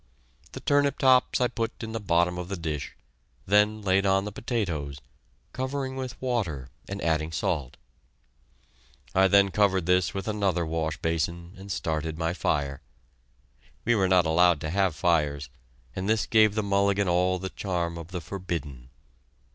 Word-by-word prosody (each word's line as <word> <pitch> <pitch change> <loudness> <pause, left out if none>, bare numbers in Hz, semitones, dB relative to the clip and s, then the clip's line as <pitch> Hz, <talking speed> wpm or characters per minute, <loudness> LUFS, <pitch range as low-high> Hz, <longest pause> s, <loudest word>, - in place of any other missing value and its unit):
The - - -6
turnip 145 +1 +2
tops 130 -1 +4
I 125 - +3
put 115 0 -4
in 110 - -5
the 115 - -3
bottom 90 -2 +1
of 90 - -5
the 100 - -3
dish, 80 -4 -4 0.5
then 105 +2 +3
laid 95 0 +3
on 95 0 +2
the 105 - -4
potatoes, 85 - -3 0.5
covering 130 0 -3
with 130 -2 -5
water 95 - -2 0.2
and 100 0 -4
adding 80 -1 0
salt. 70 -3 -2 1.4
I 95 +1 +5
then 100 0 +4
covered 95 -4 +2
this 90 -1 +2
with 95 -2 -5
another 100 -5 0
wash 80 -1 -2
basin, 85 +2 -2
and 95 +1 -9
started 80 -2 -2
my 80 0 -1
fire. 70 -6 -1 1.0
We 120 - +4
were 95 -4 +2
not 90 -2 +4
allowed 85 0 +4
to 80 - -3
have 95 -3 +1
fires, 75 -4 +1 0.5
and 95 +2 -3
this 110 -1 +2
gave 110 -2 +4
the 110 - 0
mulligan 100 0 +2
all 90 +1 +2
the 95 0 -5
charm 85 -3 -3
of 80 - -8
the 90 -1 -5
forbidden. 75 -7 -6
95 Hz, 160 wpm, -27 LUFS, 80-105 Hz, 1.4 s, I